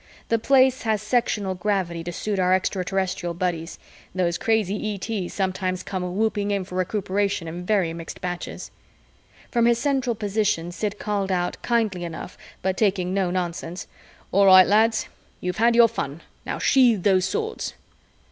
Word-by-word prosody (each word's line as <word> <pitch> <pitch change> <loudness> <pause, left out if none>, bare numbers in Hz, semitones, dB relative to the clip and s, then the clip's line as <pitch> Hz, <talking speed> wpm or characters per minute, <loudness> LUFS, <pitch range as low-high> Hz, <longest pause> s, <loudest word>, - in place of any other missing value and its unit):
The 230 - +2
Place 260 +1 +4
has 220 -2 0
sectional 210 -3 0
gravity 180 -3 -1
to 175 - -3
suit 200 +3 -3
our 185 0 +4
Extraterrestrial 185 -2 -2
buddies 170 -2 -3 0.4
those 175 -2 0
crazy 215 -1 0
ETs 195 -2 -4
sometimes 185 -1 -1
come 180 -1 -4
whooping 210 -2 0
in 200 -2 0
for 180 - -12
recuperation 195 0 -1
in 175 +2 -6
very 190 -6 +2
mixed 165 0 -8
batches. 180 -1 -5 0.8
From 235 -1 +3
his 235 -1 +4
central 265 -2 0
position, 205 -5 -1
Sid 205 +3 -3
called 200 -2 -2
out, 180 -1 -1
kindly 220 -7 0
enough 170 +1 -7 0.3
but 190 0 0
taking 190 -4 +1
no 190 -2 +1
nonsense, 175 -1 -3 0.5
"All 200 +1 +5
right, 185 -1 +9
lads, 220 +3 +3 0.3
you've 180 0 -3
had 235 +1 +4
your 235 -1 +8
fun. 165 -8 -5 0.3
Now - - -2
sheathe 240 -8 +4
those 190 -2 +3
swords." 445 - -3
195 Hz, 155 wpm, -24 LUFS, 180-215 Hz, 0.8 s, right